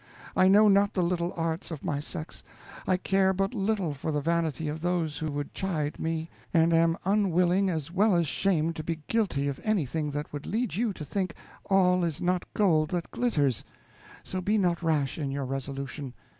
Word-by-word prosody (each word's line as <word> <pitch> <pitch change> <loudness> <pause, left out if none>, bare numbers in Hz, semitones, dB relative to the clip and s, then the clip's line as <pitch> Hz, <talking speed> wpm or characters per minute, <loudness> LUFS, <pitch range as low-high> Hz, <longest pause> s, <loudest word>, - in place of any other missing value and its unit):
I 185 - +5
know 210 +3 +7
not 200 +1 +4
the 185 - +2
little 170 0 0
arts 165 0 -2
of 160 -4 -7
my 145 - -1
sex. 155 +2 -6 0.5
I 185 - +3
care 190 +1 +2
but 195 +4 -1
little 195 -6 0
for 145 +3 -4
the 150 - 0
vanity 160 -1 0
of 155 +1 -4
those 170 -4 -1
who 155 -1 -2
would 145 0 -4
chide 155 -6 -2
me, 160 0 -2 0.2
and 165 0 +4
am 165 0 +3
unwilling 190 -1 +3
as 160 -3 -3
well 200 +2 +3
as 170 -1 +3
shamed 165 0 +1
to 155 - -4
be 160 -1 -4
guilty 195 -11 0
of 140 -2 -4
anything 160 - 0
that 145 +1 -5
would 145 0 -6
lead 235 +4 -1
you 225 +2 0
to 155 -5 -7
think 185 +5 -2 0.3
'all 180 -2 +3
is 165 -4 -1
not 180 0 -1
gold 160 -7 +3
that 175 -2 -3
glitters'; 145 - +1 0.6
so 185 - -4
be 210 +4 +1
not 175 -4 +1
rash 155 -4 0
in 145 -3 -2
your 140 0 -3
resolution. 135 0 -5
170 Hz, 195 wpm, -28 LUFS, 150-190 Hz, 0.6 s, know